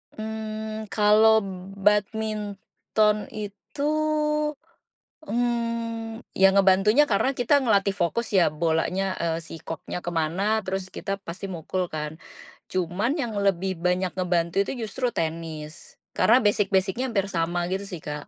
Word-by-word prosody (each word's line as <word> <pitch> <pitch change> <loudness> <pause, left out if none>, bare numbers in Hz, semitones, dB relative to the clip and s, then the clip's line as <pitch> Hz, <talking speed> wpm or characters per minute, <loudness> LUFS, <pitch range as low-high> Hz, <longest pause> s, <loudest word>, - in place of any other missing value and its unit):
Mmm, 220 0 -5
kalau 215 +1 +5 0.3
badminton 210 +1 0
itu, 210 +6 -7 1.4
mmm, 230 -2 -2 0.2
yang 195 0 +6
ngebantunya 195 +9 +5
karena 220 +5 +2
kita 265 +1 +2
ngelatih 200 -4 +2
fokus 205 +6 0
ya 180 -5 +5
bolanya, 170 +4 0
eee, 165 -1 0
si 165 - -8
koknya 165 +2 -5
ke 175 - -2
mana 195 +8 +1
terus 190 0 -2
kita 195 - -3
pasti 170 +4 -5
mukul 185 +1 -3
kan, 150 -1 -3 0.6
cuman 185 +6 0
yang 235 -4 -3
lebih 190 -2 0
banyak 180 +1 +1
ngebantu 175 -2 0
itu - - -4 0.2
justru 250 +5 -1
tenis, 160 -1 -5 0.2
karena - - +6
basic-basic-nya 205 +3 +2
hampir 200 -3 0
sama 170 0 0
gitu 195 +1 -2
sih 175 -5 -7
Kak. 150 -1 -6
195 Hz, 125 wpm, -25 LUFS, 175-220 Hz, 1.4 s, yang